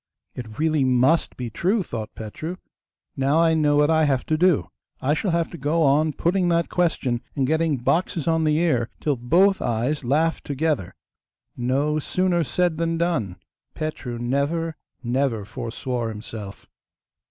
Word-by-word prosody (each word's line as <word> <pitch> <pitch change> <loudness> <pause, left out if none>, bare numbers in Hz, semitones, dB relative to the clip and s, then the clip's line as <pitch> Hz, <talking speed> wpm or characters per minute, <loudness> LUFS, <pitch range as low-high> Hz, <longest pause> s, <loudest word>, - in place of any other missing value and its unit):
'It 110 -4 -8
really 155 -2 +2
MUST 130 +5 +2
be 120 -2 -5
true,' 190 - +1
thought 110 -7 -6
Petru. 155 +11 -6 0.6
'Now 135 +3 +2
I 165 -1 +4
know 150 -2 +3
what 150 +2 +4
I 160 -1 +4
have 135 -3 +1
to 155 - +1
do. 160 - +2 0.3
I 140 +3 +1
shall 195 +5 -1
have 170 -1 0
to 170 - -8
go 160 +4 +1
on 150 +2 +3
putting 180 +4 +1
that 170 -1 +1
question, 145 -9 0
and 135 -3 +1
getting 160 0 +1
boxes 165 +6 0
on 160 -1 +2
the 155 -1 +2
ear, 140 -9 +1
till 145 -2 0
both 175 +11 +3
eyes 125 +6 -1
laugh 155 +6 +1
together.' 145 - -2 0.6
No 140 +5 0
sooner 180 +2 +1
said 175 +1 0
than 165 0 0
done. 150 - -1 0.4
Petru 145 -6 -4
never, 140 +7 -1 0.3
never 120 -3 0
forswore 120 +1 -4
himself. 105 -2 -8
150 Hz, 155 wpm, -23 LUFS, 125-165 Hz, 0.6 s, I